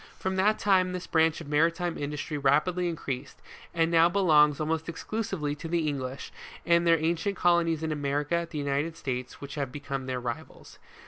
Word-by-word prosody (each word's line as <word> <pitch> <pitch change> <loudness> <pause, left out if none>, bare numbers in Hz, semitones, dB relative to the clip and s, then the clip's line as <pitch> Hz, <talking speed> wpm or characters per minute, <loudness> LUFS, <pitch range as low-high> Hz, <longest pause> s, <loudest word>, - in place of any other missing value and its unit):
From 190 0 -2
that 210 +3 +3
time 185 -2 +2
this 180 0 -5
branch 160 0 +2
of 160 - -9
maritime 165 +3 +1
industry 150 +1 -4
rapidly 150 +6 +2
increased, 140 -4 -5 0.3
and 165 0 +1
now 165 0 +5
be 185 - -2
longs 150 -6 +5
almost 160 +1 -1
exclusively 175 -3 -3
to 150 +3 -7
the 170 +1 0
hlnglish, 130 -1 -6 0.3
and 170 0 +3
their 165 0 +6
ancient 170 +5 -1
colonies 170 -2 +2
in 160 - -1
America, 145 +3 -1
the 155 - -6
United 145 +3 -1
States, 125 -3 -4
which 140 0 -7
have 140 -4 -3
become 140 -2 -5
their 130 -1 -2
rivals. 120 -1 -7
160 Hz, 180 wpm, -28 LUFS, 145-170 Hz, 0.3 s, their